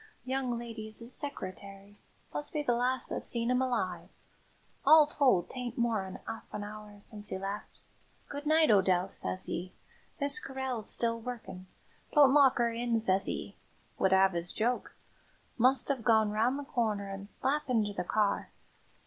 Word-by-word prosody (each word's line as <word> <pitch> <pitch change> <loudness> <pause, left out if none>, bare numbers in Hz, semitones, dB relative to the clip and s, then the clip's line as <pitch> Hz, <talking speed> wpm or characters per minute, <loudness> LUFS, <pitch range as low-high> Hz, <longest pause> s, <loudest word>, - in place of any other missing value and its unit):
"Young 255 -2 -1
lady's 225 -2 -6
'is 235 +2 -4
seccereterry 200 -6 -5 0.4
must 145 0 -2
be 300 - -1
the 245 - +2
last 250 +2 0
that - - -2
seen 235 0 -1
'im 250 0 +2
alive. 215 -9 -2 0.7
All 305 +2 +8
told, 265 - +2
'tain't 250 -2 -5
more'n 220 -6 -1
'arf 225 0 -7
an 210 - -5
'our 210 0 -10
since 210 -1 -9
'e - - -2
left. 195 +2 -6 0.5
'Good 290 +1 -6
night, 315 -3 +5
O'Dell,' 190 -2 +3
sez 90 - -2
'e. 180 +2 -4 0.5
'Miss 280 -1 +4
Carryll's 265 -4 -1
still 230 -1 +1
working 225 -6 -8 0.5
don't 285 -3 +6
lock 275 -3 +5
'er 235 -1 +2
in,' 235 0 0
sez 195 -3 +1
'e. - - -5 0.4
Would 190 - +3
'ave 190 -2 +4
'is 170 +2 -3
joke. 240 +3 -1 0.6
Must 255 +3 +3
'ave 265 -4 -2
gone 220 -2 +3
round 230 +6 +1
the 285 - -5
corner 220 -7 -1
an' 195 0 -7
slap 290 +6 -1
inter 215 -4 +1
the - - -2
car. 210 +3 0
230 Hz, 165 wpm, -31 LUFS, 200-255 Hz, 0.7 s, All